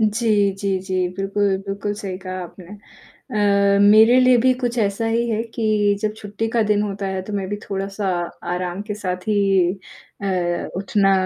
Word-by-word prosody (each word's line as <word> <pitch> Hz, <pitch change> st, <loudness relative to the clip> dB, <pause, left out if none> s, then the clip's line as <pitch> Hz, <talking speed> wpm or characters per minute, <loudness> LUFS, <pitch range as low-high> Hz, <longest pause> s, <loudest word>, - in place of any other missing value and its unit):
जी, 215 Hz, -2 st, +2 dB
जी, 195 Hz, 0 st, -2 dB
जी 185 Hz, -1 st, -1 dB
बिल्कुल, 195 Hz, 0 st, 0 dB
बिल्कुल 200 Hz, +1 st, -3 dB
सही 195 Hz, -3 st, -5 dB
कहा 185 Hz, -1 st, -6 dB
आपने। 180 Hz, +1 st, -11 dB, 1.1 s
अ, -, -, +3 dB
मेरे 220 Hz, +4 st, +7 dB
लिए 255 Hz, 0 st, +5 dB
भी 255 Hz, +2 st, +4 dB
कुछ 245 Hz, 0 st, -1 dB
ऐसा 205 Hz, +1 st, 0 dB
ही 230 Hz, +1 st, 0 dB
है 220 Hz, 0 st, 0 dB
कि 215 Hz, -2 st, +2 dB
जब 215 Hz, 0 st, -1 dB
छुट्टी 210 Hz, +1 st, -4 dB
का 230 Hz, 0 st, +2 dB
दिन 210 Hz, -1 st, +1 dB
होता 200 Hz, -1 st, -3 dB
है, 190 Hz, -1 st, -2 dB
तो 210 Hz, -, -8 dB
मैं 200 Hz, -2 st, -2 dB
भी 205 Hz, -, -3 dB
थोड़ा-सा 195 Hz, 0 st, -3 dB, 0.4 s
आराम 180 Hz, +2 st, -3 dB
के 210 Hz, -, -2 dB
साथ 185 Hz, -2 st, -5 dB
ही 195 Hz, -3 st, +2 dB, 0.4 s
अ, 180 Hz, -3 st, -1 dB
उठना 195 Hz, +1 st, +2 dB
200 Hz, 175 wpm, -21 LUFS, 190-215 Hz, 1.1 s, मेरे